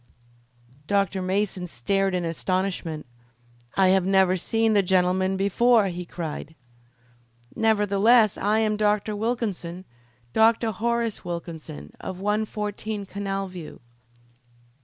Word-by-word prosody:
Dr. 200 -1 +1
Mason 185 -1 -1
stared 195 - 0
in 175 -1 -1
astonishment. 175 -1 -2 0.7
"I 190 -1 +5
have 190 0 +4
never 190 -1 +3
seen 225 +4 +1
the 205 - +5
gentleman 185 0 +2
before!" 205 +2 +3
he 180 0 -5
cried. 160 -2 -6 1.0
"Nevertheless 215 0 +4
I 215 +2 +1
am 215 -1 +1
Dr. 210 0 +1
Wilkinson 205 -6 -3 0.5
Dr. 225 0 +3
Horace 230 +1 -1
Wilkinson, 165 - -7
of 185 -1 -6
114 210 0 -2
Canal 195 0 -3
View." 180 -4 -9
195 Hz, 105 wpm, -25 LUFS, 180-215 Hz, 1.0 s, I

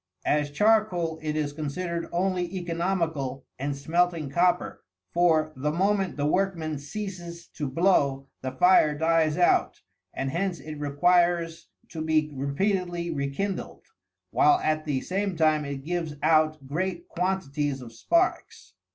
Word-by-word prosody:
As 150 0 +1
charcoal, 180 -2 +2
it 155 -1 -2
is 150 -2 -1
considered 165 +3 -4
only 180 0 0
economical 165 -6 -2
in 140 +1 -2
smelting 165 0 0
copper; 180 +3 +1 0.3
for 160 -3 +3
the 150 +3 -1
moment 195 +2 0
the 145 - 0
workman 160 -3 0
ceases 175 +1 -7
to 145 -4 -4
blow, 140 -4 +2
the 130 - -3
fire 150 +1 +4
dies 160 -1 +2
out, 175 - +2 0.3
and 135 0 -3
hence 180 +2 -1
it 155 -1 -8
requires 170 +3 +1 0.2
to 160 - -6
be 155 -1 +1
repeatedly 175 +5 -1
rekindled; 150 +7 -3 0.5
while 365 0 +4
at 155 0 0
the 140 -4 -1
same 195 0 -2
time 155 -2 +3
it 140 -1 -6
gives 165 -3 -2
out 155 -2 +3
great 175 +4 -3
quantities 150 -6 -1
of 120 -3 -10
sparks. 335 - -1
165 Hz, 135 wpm, -26 LUFS, 145-180 Hz, 0.5 s, fire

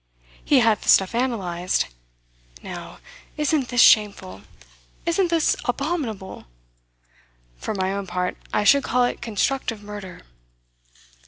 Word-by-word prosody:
He 275 -4 +4
had 225 -3 +2
the - - -4
stuff 190 +3 +5
analysed. 190 -8 -1 0.8
Now, - - -8 0.4
isn't 300 -3 +1
this 245 -1 +2
shameful? 200 - +4 0.6
Isn't 340 +2 +1
this 335 -2 +2
abominable? 245 - -3 1.1
For 135 - -4
my 190 0 -1
own 200 -1 -4
part, 180 0 -2 0.2
I 210 - +1
should 280 +6 +5
call 250 0 +1
it 245 - -2
constructive 230 0 -2
murder. 205 -3 -9
225 Hz, 115 wpm, -23 LUFS, 190-270 Hz, 1.1 s, stuff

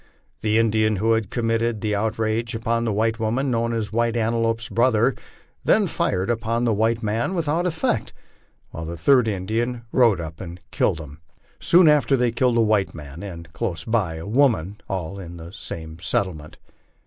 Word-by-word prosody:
The 110 0 +1
Indian 110 -1 +2
who 110 +4 +1
had 110 -4 +1
committed 115 -1 0
the 105 0 -1
outrage 110 +2 -1
upon 115 +1 0
the 110 - 0
white 110 +2 0
woman, 120 +5 0
known 115 0 0
as 110 -2 -3
White 115 0 +1
Antelope's 115 0 0
brother, 120 +1 +2 0.5
then - - +4
fired 95 +1 -1
upon 115 0 -1
the 115 -2 +2
white 115 +2 +1
man 115 - -1
without 165 +1 0
effect, 160 -2 -1 0.6
while 80 - -6
the 85 +1 -5
third 125 - +4
Indian 110 +5 -2
rode 115 -8 +4
up 80 -1 -7
and 90 -1 -8
killed 80 - +1
him. 75 -1 -10 0.4
Soon 175 0 +5
after 140 -3 +4
they 125 -1 +2
killed 120 0 +2
a - - +5
white 105 -4 +1
man, 75 +1 -9
and, 85 -4 -8
close 85 -4 -3
by, 105 -8 0
a 80 - -7
woman 105 - +1
all 95 0 -4
in 85 -2 -8
the 85 +2 -10
same 80 -3 -8
settlement. 85 -5 -2
110 Hz, 175 wpm, -23 LUFS, 95-115 Hz, 0.6 s, Soon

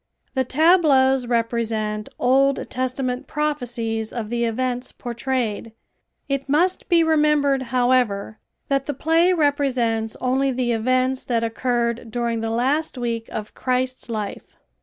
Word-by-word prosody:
The 265 - +1
tableaus 270 -4 +4
represent 225 -3 -1
Old 270 +2 +2
Testament 255 +1 -2
prophecies 240 -7 -2
of 225 -2 -5
the 235 0 0
events 250 +2 -2
portrayed. 235 -3 -3 0.5
It 275 -1 -2
must 350 +6 +1
be 340 -2 +5
remembered, 300 -3 +3
however, 245 -5 +1 0.3
that 275 -1 0
the 290 - -2
play 330 +5 +3
represents 260 -8 0
only 265 +2 +1
the 250 -1 -1
events 255 +3 +1
that 230 -2 0
occurred 235 0 -1
during 235 0 -2
the 225 - -2
last 265 +6 0
week 230 -2 -3
of 210 -1 -6
Christ's 255 0 -2
life. 215 -3 -5
255 Hz, 125 wpm, -22 LUFS, 230-275 Hz, 0.5 s, be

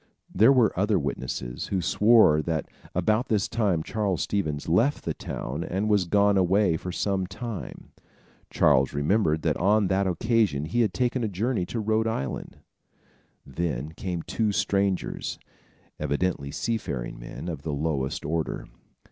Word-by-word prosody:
There 110 +7 +6
were 125 -6 +4
other 105 +1 +2
witnesses, 70 -5 -4
who 95 - -1
swore 105 -3 +5
that 80 -2 -2 0.3
about 110 +7 +1
this 105 -3 +1
time 100 -8 0
Charles 100 -4 -1
Stevens 75 -8 -2
left 115 - +2
the - - -1
town 75 +7 -5
and 95 +4 -2
was 100 -3 +3
gone 100 +2 +3
away 95 -1 +3
for 90 +3 -5
some 95 0 -1
time. 110 +3 -7 0.6
Charles 65 +1 +3
remembered 80 +1 +1
that - - +1
on 100 +1 +3
that 95 0 +2
occasion 95 - +1
he 105 +10 0
had 110 -4 +2
taken 125 0 0
a - - +1
journey 105 0 -1
to 115 - -3
Rhode 110 +1 +1
Island. 70 - -4 0.9
Then 75 0 -3
came 90 0 -4
two 110 -2 0
strangers, 100 -1 -1 0.6
evidently 70 -2 -1
sea 115 +10 -1
faring - - -5
men, - - -8
of 80 -5 -4
the 75 - -4
lowest 70 -2 -2
order. 80 +1 -2
95 Hz, 150 wpm, -26 LUFS, 80-110 Hz, 0.9 s, There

